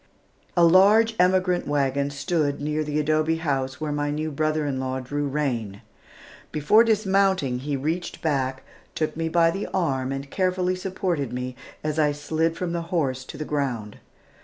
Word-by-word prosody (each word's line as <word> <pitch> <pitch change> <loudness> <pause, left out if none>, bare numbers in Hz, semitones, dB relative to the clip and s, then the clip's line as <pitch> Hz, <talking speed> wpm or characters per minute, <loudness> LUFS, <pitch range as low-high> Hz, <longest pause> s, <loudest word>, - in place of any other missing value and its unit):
A 175 - +6
large 205 +6 +5
emigrant 180 0 +2
wagon 140 -1 +1
stood 145 0 -1
near 150 +1 -1
the 150 0 -1
adobe 155 +1 +2
house 135 -5 -2
where 155 -1 -2
my 145 0 -1
new 155 +1 -2
brother 155 +1 0
in 135 -2 -2
law 130 0 -2
drew 145 +3 -3
rein. 120 -9 -2 0.7
Before 155 +10 +5
dismounting, 195 - +2
he 145 +2 -2
reached 160 +6 -3
back, 135 -4 -1 0.3
took 155 - -1
me 165 0 -2
by 165 0 +4
the 195 +4 -4
arm 135 -8 -1
and 135 0 -5
carefully 185 -1 0
supported 180 - -2
me 125 0 -4 0.3
as 155 0 -1
I 150 -1 +3
slid 160 +3 -1
from 175 -2 -2
the 170 - -1
horse 135 -8 0
to - - -9
the 155 - -4
ground. 125 -9 -3
150 Hz, 165 wpm, -24 LUFS, 140-175 Hz, 0.7 s, A